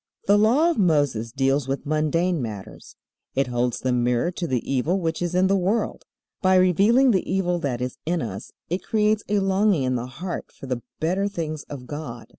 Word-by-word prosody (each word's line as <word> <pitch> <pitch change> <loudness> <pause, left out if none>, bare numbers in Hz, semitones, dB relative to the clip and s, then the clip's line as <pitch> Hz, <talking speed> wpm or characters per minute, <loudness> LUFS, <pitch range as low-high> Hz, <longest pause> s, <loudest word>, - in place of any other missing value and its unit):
The 200 - +5
Law 265 +11 +4
of 325 - -3
Moses 145 - +2
deals 135 +1 +1
with 135 +1 -3
mundane 155 +3 +1
matters. 105 -5 -8 0.4
It 135 +1 +2
holds 120 -1 -1
the 130 - -1
mirror 125 +6 +1
to 175 -1 -4
the 125 -5 -2
evil 145 +8 +1
which 165 -2 -2
is 175 0 -1
in 185 +1 +4
the 195 +1 +3
world. 195 +5 -1 0.4
By 185 -1 +4
revealing 200 +9 +5
the 190 -4 0
evil 180 -2 +1
that 130 -6 -2
is 125 0 -4
in 170 +2 0
us 100 -8 -5 0.2
it 180 +3 -2
creates 215 0 +1
a 210 - +2
longing 195 -4 +2
in 130 0 0
the 125 0 -2
heart 170 +8 -6
for - - -12
the 125 -2 -3 0.2
better 185 +5 0
things 160 -6 -4
of 135 -4 -7
God. 140 -5 -7
160 Hz, 200 wpm, -24 LUFS, 130-190 Hz, 0.4 s, The